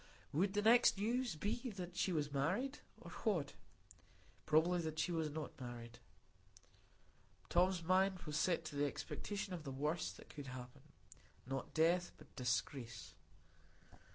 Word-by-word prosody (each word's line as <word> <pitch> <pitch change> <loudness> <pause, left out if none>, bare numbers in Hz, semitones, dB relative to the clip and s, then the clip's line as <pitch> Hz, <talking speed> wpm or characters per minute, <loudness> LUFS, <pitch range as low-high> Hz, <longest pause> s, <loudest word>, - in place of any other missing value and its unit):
Would 190 +6 +2
the 205 - +2
next 235 -1 +7
news 235 +1 0
be 235 - -2
that 180 -2 -6
she 185 +1 +1
was 150 -4 0
married,—or 195 - -2
what? 175 - +1 0.9
Probably 170 +3 +4
that 160 -1 -3
she 180 - +1
was 160 -2 0
not 150 -2 -6
married; 120 -1 -7 1.5
Tom's 180 0 +3
mind 185 +2 +3
was 150 -2 -4
set 170 +3 +2
to - - -6
the 145 0 +2
expectation 195 +6 -4
of 170 -3 -5
the 140 - -5
worst 150 +5 -1
that - - -14
could 145 -2 -8
happen,—not 125 +1 -9
death, 170 +2 +3
but - - -17
disgrace. 125 -2 -2
165 Hz, 135 wpm, -39 LUFS, 140-190 Hz, 1.5 s, next